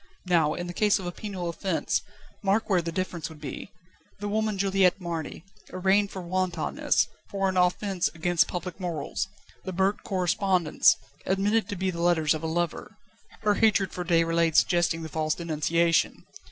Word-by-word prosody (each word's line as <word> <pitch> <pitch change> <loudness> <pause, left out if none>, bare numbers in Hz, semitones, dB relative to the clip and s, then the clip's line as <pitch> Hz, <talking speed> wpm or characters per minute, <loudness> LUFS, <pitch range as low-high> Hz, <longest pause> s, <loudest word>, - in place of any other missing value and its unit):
Now, 165 -4 +2
in 175 - -4
the 175 - -6
case 210 +2 +3
of 190 - -7
a 175 - -2
penal 190 -2 -5
offence, 170 +1 -1 0.4
mark 200 +2 +1
where 180 -2 +4
the 165 0 -4
difference 175 -2 -3
would 160 -2 -12
be! 150 +6 -7 0.5
The 205 - -4
woman 215 0 0
Juliette 195 -1 +3
Marny, 165 -3 -5 0.3
arraigned 195 +2 +2
for 190 -2 -7
wantonness, 175 -2 0 0.2
for 195 -1 0
an 190 - -1
offence 180 +1 +1
against 175 +1 +2
public 180 +1 -5
morals; 175 0 -3 0.4
the 190 - -4
burnt 190 +3 +1
correspondence, 185 -2 +2 0.3
admitted 205 +4 +1
to 200 - -3
be 190 0 -1
the 170 -1 -5
letters 165 -3 +3
of 155 - -4
a 160 - -2
lover 170 0 -3 0.4
her 210 -1 +3
hatred 205 -3 +3
for 180 - -4
Déroulède 165 -1 +2
suggesting 175 -2 +3
the - - -4
false 155 0 -1
denunciation. 170 +1 +1
180 Hz, 165 wpm, -27 LUFS, 165-195 Hz, 0.5 s, where